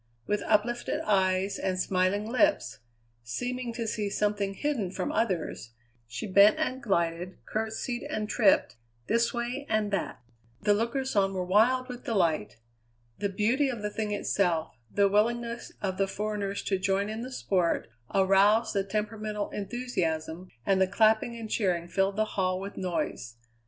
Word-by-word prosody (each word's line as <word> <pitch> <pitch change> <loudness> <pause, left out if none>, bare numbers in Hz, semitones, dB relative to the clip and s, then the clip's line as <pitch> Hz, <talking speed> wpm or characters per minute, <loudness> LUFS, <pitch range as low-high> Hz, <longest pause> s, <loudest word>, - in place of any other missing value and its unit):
With 210 0 0
uplifted 230 +3 +1
eyes 190 -1 +1
and 185 -1 -1
smiling 185 +3 +1
lips, 255 - +1 0.4
seeming 245 - -3
to 230 0 -3
see 210 -2 -2
something 205 -1 0
hidden 270 -10 -1
from 185 0 -3
others, 180 - -2 0.3
she 120 - -5
bent 200 +1 +6
and 260 +1 -1
glided, 175 -3 -1
curtesied 225 +3 -3
and 215 0 -2
tripped, 210 - +3 0.3
this 235 - +2
way 245 +4 -3
and 215 -1 +1
that. 195 -9 -2 0.4
The 210 0 +3
lookers 235 +5 -1
on 195 -1 +2
were 180 -1 -1
wild 240 +7 +3
with 250 -1 -8
delight. 165 - 0 0.6
The 200 - 0
beauty 235 +8 +1
of 235 -5 -5
the 210 - -2
thing 215 0 -3
itself, 175 -5 0 0.2
the 200 -1 +4
willingness 235 +3 0
of 190 -2 -1
the 195 - +2
foreigners 205 -1 -3
to 195 -2 0
join 195 +1 +1
in 220 +1 -4
the 255 +2 -6
sport, 185 -8 0 0.2
aroused 195 +4 +4
the 200 -2 +1
temperamental 210 +1 -3
enthusiasm, 180 -7 -3 0.2
and 190 -1 +3
the 190 - +5
clapping 220 +4 +3
and 230 -1 -6
cheering 180 -6 0
filled 195 +2 +1
the 215 +1 +2
hall 185 -3 -1
with 195 +1 -7
noise. 170 -10 -3
205 Hz, 155 wpm, -28 LUFS, 190-225 Hz, 0.6 s, bent